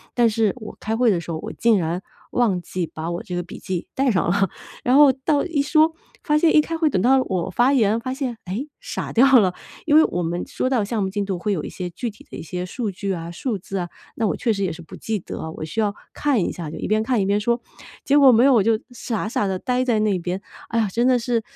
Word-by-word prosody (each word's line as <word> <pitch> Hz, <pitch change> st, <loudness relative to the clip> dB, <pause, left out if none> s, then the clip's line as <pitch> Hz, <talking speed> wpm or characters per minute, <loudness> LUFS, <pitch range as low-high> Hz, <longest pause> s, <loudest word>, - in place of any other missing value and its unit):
但 240 Hz, -1 st, +4 dB
是 220 Hz, +1 st, +1 dB
我 215 Hz, -3 st, -9 dB
开 220 Hz, +1 st, -2 dB
会 240 Hz, -3 st, +4 dB
的 170 Hz, -3 st, 0 dB
时 170 Hz, -, -11 dB
候， 160 Hz, -, -2 dB
我 -, -, -6 dB
竟 230 Hz, -3 st, +3 dB
然 170 Hz, +2 st, -2 dB, 0.3 s
忘 215 Hz, -7 st, +2 dB
记 180 Hz, -3 st, -3 dB
把 160 Hz, +2 st, -5 dB
我 170 Hz, -, -3 dB
这 180 Hz, -, -5 dB
个 175 Hz, -, -2 dB
笔 -, -, -10 dB
记 185 Hz, -2 st, -4 dB
带 270 Hz, -1 st, +1 dB
上 180 Hz, -, +1 dB
了， 195 Hz, 0 st, +2 dB, 0.3 s
然 250 Hz, +2 st, +3 dB
后 285 Hz, -3 st, +7 dB
到 280 Hz, +2 st, 0 dB
一 320 Hz, -5 st, 0 dB
说 310 Hz, +2 st, +3 dB, 0.3 s
发 300 Hz, -1 st, +2 dB
现 320 Hz, +1 st, +4 dB
一 -, -, +8 dB
开 330 Hz, +2 st, -4 dB
会， 320 Hz, -2 st, +2 dB
等 185 Hz, -8 st, 0 dB
到 265 Hz, +3 st, +4 dB
我 185 Hz, -1 st, -2 dB
发 245 Hz, +8 st, +3 dB
言 225 Hz, -3 st, +3 dB
发 255 Hz, +1 st, -3 dB
现， 255 Hz, -4 st, -3 dB
诶， 220 Hz, +11 st, -4 dB
傻 -, -, -5 dB
掉 260 Hz, +1 st, +7 dB
了， 185 Hz, -3 st, +2 dB, 0.3 s
因 300 Hz, -1 st, +3 dB
为 315 Hz, -, +8 dB
我 175 Hz, -, -2 dB
们 175 Hz, +1 st, -2 dB
说 255 Hz, -, -2 dB
到 245 Hz, -6 st, +2 dB
项 215 Hz, 0 st, -2 dB
目 190 Hz, -, 0 dB
进 205 Hz, +1 st, -2 dB
度 190 Hz, -3 st, -3 dB
会 205 Hz, +3 st, 0 dB
有 160 Hz, -, -2 dB
一 -, -, -5 dB
些 180 Hz, -1 st, -5 dB
具 235 Hz, +7 st, -4 dB
体 210 Hz, -, -15 dB
的 -, -, -9 dB
一 -, -, -6 dB
些 180 Hz, +2 st, -4 dB
数 215 Hz, +2 st, -3 dB
据 195 Hz, +1 st, -3 dB
啊， 170 Hz, 0 st, -5 dB
数 220 Hz, +4 st, -3 dB
字 195 Hz, +1 st, -6 dB
啊， 175 Hz, -1 st, -3 dB, 0.3 s
那 225 Hz, -2 st, 0 dB
我 -, -, 0 dB
确 235 Hz, -, 0 dB
实 200 Hz, -1 st, -2 dB
也 175 Hz, -, -1 dB
是 170 Hz, -, -10 dB
不 160 Hz, -, -11 dB
记 220 Hz, -1 st, -2 dB
得 -, -, -8 dB
啊， 160 Hz, -, -5 dB
我 155 Hz, -, -7 dB
需 160 Hz, +8 st, -5 dB
要 205 Hz, -1 st, +1 dB, 0.2 s
看 285 Hz, -6 st, +1 dB
一 -, -, -1 dB
下， 165 Hz, -4 st, -6 dB
就 160 Hz, -, -7 dB
一 -, -, -4 dB
边 215 Hz, +1 st, +2 dB
看 235 Hz, -2 st, +1 dB
一 -, -, +1 dB
边 200 Hz, +1 st, +2 dB
说。 235 Hz, +3 st, 0 dB, 0.4 s
结 285 Hz, +1 st, +3 dB
果 270 Hz, -2 st, +8 dB
没 230 Hz, +3 st, +5 dB
有， 275 Hz, -, +6 dB
我 225 Hz, -, +5 dB
就 225 Hz, +1 st, +3 dB
傻 230 Hz, -3 st, -3 dB
傻 205 Hz, -, 0 dB
地 190 Hz, -1 st, -1 dB
待 250 Hz, +4 st, 0 dB
在 230 Hz, -4 st, +2 dB
那 205 Hz, -4 st, +1 dB
边， 180 Hz, +3 st, -3 dB, 0.3 s
哎 230 Hz, -, -1 dB
呀， 215 Hz, -, +2 dB
真 240 Hz, +4 st, +2 dB
的 255 Hz, -1 st, +4 dB
是， 235 Hz, -1 st, 0 dB
215 Hz, 305 characters per minute, -22 LUFS, 185-250 Hz, 0.4 s, 一